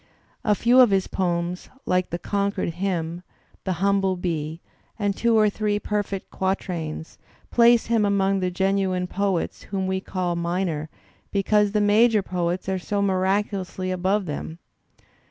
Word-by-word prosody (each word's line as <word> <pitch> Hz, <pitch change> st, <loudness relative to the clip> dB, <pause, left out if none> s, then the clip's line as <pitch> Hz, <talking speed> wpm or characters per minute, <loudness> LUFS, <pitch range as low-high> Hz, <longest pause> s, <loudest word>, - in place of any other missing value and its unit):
A 210 Hz, -2 st, +3 dB
few 240 Hz, +5 st, +4 dB
of 250 Hz, -3 st, +8 dB
his 195 Hz, -1 st, +2 dB
poems, 175 Hz, -1 st, -2 dB, 0.2 s
like 180 Hz, 0 st, +1 dB
the 170 Hz, -, -2 dB
"Concord 200 Hz, +1 st, -1 dB
Hymn,'* 170 Hz, -1 st, -2 dB, 0.4 s
"The 190 Hz, -, 0 dB
Humble 195 Hz, +1 st, +1 dB
Bee," 165 Hz, -3 st, -3 dB, 0.4 s
and 205 Hz, -3 st, 0 dB
two 230 Hz, +1 st, +2 dB
or 215 Hz, -1 st, +5 dB
three 210 Hz, 0 st, 0 dB
perfect 205 Hz, -2 st, -3 dB
quatrains, 175 Hz, -4 st, -3 dB, 0.3 s
place 235 Hz, 0 st, +5 dB
him 230 Hz, -2 st, +2 dB
among 195 Hz, -1 st, +2 dB
the 185 Hz, -1 st, 0 dB
genuine 190 Hz, 0 st, 0 dB
poets 195 Hz, -1 st, -1 dB
whom 195 Hz, -1 st, -1 dB
we 190 Hz, 0 st, -1 dB
call 180 Hz, -2 st, -2 dB
minor 170 Hz, -3 st, -2 dB, 0.4 s
because 205 Hz, +1 st, +2 dB
the 210 Hz, -, +2 dB
major 210 Hz, +1 st, +4 dB
poets 180 Hz, 0 st, -2 dB
are 190 Hz, -1 st, 0 dB
so 200 Hz, +2 st, -1 dB
miraculously 190 Hz, -1 st, 0 dB
above 190 Hz, +2 st, 0 dB
them. 160 Hz, +1 st, -5 dB
190 Hz, 145 wpm, -24 LUFS, 180-205 Hz, 0.4 s, of